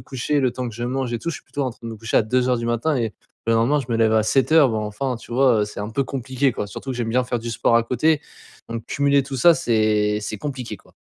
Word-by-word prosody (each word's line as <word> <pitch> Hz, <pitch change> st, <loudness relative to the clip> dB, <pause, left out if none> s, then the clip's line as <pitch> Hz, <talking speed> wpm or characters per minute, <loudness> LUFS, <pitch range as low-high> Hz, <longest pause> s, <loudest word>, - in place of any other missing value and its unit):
coucher, 135 Hz, +4 st, -1 dB
le 130 Hz, -, +2 dB
temps 125 Hz, 0 st, -4 dB
que 110 Hz, -, -9 dB
je 120 Hz, -, -6 dB
mange 130 Hz, -1 st, -2 dB
et 120 Hz, -, -1 dB
tout, 170 Hz, -, -3 dB
je -, -, -5 dB
suis -, -, -15 dB
plutôt 145 Hz, -, -4 dB
en 130 Hz, -, -1 dB
train 115 Hz, -, -15 dB
de 115 Hz, -, -6 dB
me 115 Hz, -, -6 dB
coucher 115 Hz, +1 st, -2 dB
à -, -, +3 dB
2:00 125 Hz, +4 st, 0 dB
et 115 Hz, -4 st, -2 dB, 0.3 s
le 115 Hz, -, +3 dB
lendemain 120 Hz, +6 st, +3 dB
je 125 Hz, -, -7 dB
me 115 Hz, -, +1 dB
lève 110 Hz, -1 st, +3 dB
à 110 Hz, -1 st, +3 dB
7:00, 140 Hz, +3 st, +4 dB
bon, 110 Hz, -1 st, -1 dB
enfin 125 Hz, +5 st, -3 dB
tu 115 Hz, -, -12 dB
vois 125 Hz, -3 st, +4 dB
heu, -, -, +2 dB
c'est 105 Hz, -1 st, -8 dB
un 105 Hz, -, -4 dB
peu 135 Hz, +4 st, 0 dB
compliqué, 130 Hz, 0 st, -1 dB
quoi. 105 Hz, -, -4 dB
Surtout 130 Hz, +7 st, -7 dB
que 125 Hz, -, -4 dB
j'aime 120 Hz, -2 st, -2 dB
bien 125 Hz, +3 st, +2 dB
faire 120 Hz, 0 st, -2 dB
du 115 Hz, +1 st, -6 dB
sport 115 Hz, 0 st, +2 dB
à 115 Hz, -, +4 dB
côté, 145 Hz, +6 st, +2 dB, 0.5 s
donc 115 Hz, -1 st, -5 dB
cumuler 140 Hz, 0 st, +2 dB
tout 135 Hz, 0 st, -6 dB
ça 170 Hz, +6 st, +6 dB
c'est 110 Hz, -8 st, +1 dB
c'est 105 Hz, 0 st, -5 dB
compliqué, 125 Hz, -4 st, -5 dB
quoi. -, -, -24 dB
120 Hz, 285 wpm, -22 LUFS, 115-135 Hz, 0.5 s, ça